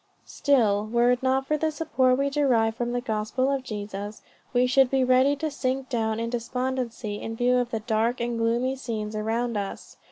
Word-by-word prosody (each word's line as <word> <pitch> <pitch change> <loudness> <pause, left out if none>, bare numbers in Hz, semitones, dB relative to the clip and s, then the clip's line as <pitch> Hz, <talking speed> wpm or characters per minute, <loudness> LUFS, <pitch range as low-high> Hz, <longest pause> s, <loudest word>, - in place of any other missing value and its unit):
"Still, 215 -7 +2
were 240 +2 +3
it 250 - 0
not 265 +1 +1
for 305 +2 0
the 315 +1 0
support 260 -5 +1
we 280 +1 0
derive 245 -6 +2
from 240 0 -2
the 245 0 -1
gospel 230 +4 -1
of 275 -1 0
Jesus, 205 -2 -6 0.3
we 245 0 +3
should 260 0 +4
be 265 0 +2
ready 255 +3 +4
to 310 +2 -3
sink 265 -1 -2
down 220 -3 -1
in 230 0 -3
despondency 245 -3 -3
in 225 - -5
view 245 +2 +2
of 245 -1 0
the 225 -2 -3
dark 225 +2 0
and 235 -1 -2
gloomy 240 +3 +1
scenes 220 -5 -4
around 225 +2 -1
us. 200 -1 -6
245 Hz, 195 wpm, -26 LUFS, 225-260 Hz, 0.3 s, should